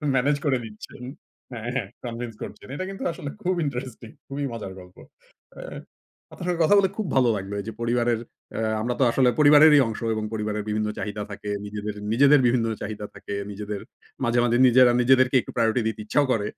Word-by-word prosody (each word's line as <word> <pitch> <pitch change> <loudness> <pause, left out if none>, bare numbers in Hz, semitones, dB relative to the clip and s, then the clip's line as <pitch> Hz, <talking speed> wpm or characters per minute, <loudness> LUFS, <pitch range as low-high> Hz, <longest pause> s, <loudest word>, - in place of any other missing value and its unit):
Manage 140 +3 +2
করে 135 -3 +2
দিচ্ছেন। 110 +3 -11 0.5
হ্যাঁ, 120 0 -5
হ্যাঁ 115 -7 -1 0.2
convince 115 -1 -5
করছেন। - - -10
এটা 185 - -3
কিন্তু 195 - -7
আসলে 145 -3 -7
খুব 185 -1 0
ইন্টারেস্টিং 125 -4 -5 0.2
খুবই 140 +1 -3
মজার 105 -4 -6
গল্প। 90 0 -15 0.6
আ - - -9 0.7
আপনার 175 - -7
সাথে 175 -1 -1
কথা 205 - +5
বলে 190 - +2
খুব 215 -5 -2
ভালো 125 -3 +4
লাগলো। 100 0 -5
এই 100 - -6
যে, - - -3
পরিবারের 120 -1 +1 0.4
আ - - -1 0.2
আমরা 120 +1 -1
তো - - +4
আসলে 125 0 +3
পরিবারেরই 150 0 +8
অংশ 110 - -5 0.2
এবং 110 - -3
পরিবারের 105 -1 -2
বিভিন্ন 105 0 0
চাহিদা 105 0 -4
থাকে। 105 0 -7 0.6
নিজেদের 140 +4 +6
বিভিন্ন 120 -1 +2 0.2
চাহিদা 105 0 -5
থাকে। - - -7 0.2
নিজেদের 105 0 -5 0.4
মাঝে 120 +1 +2
মাঝে 120 0 +2 0.4
নিজেদেরকে 130 +1 +4
একটু - - -10
প্রায়োরিটি 115 0 +2
দিতে 110 -1 -3
ইচ্ছাও 145 +6 +2
করে, 105 -3 0
120 Hz, 180 wpm, -24 LUFS, 105-140 Hz, 0.7 s, পরিবারেরই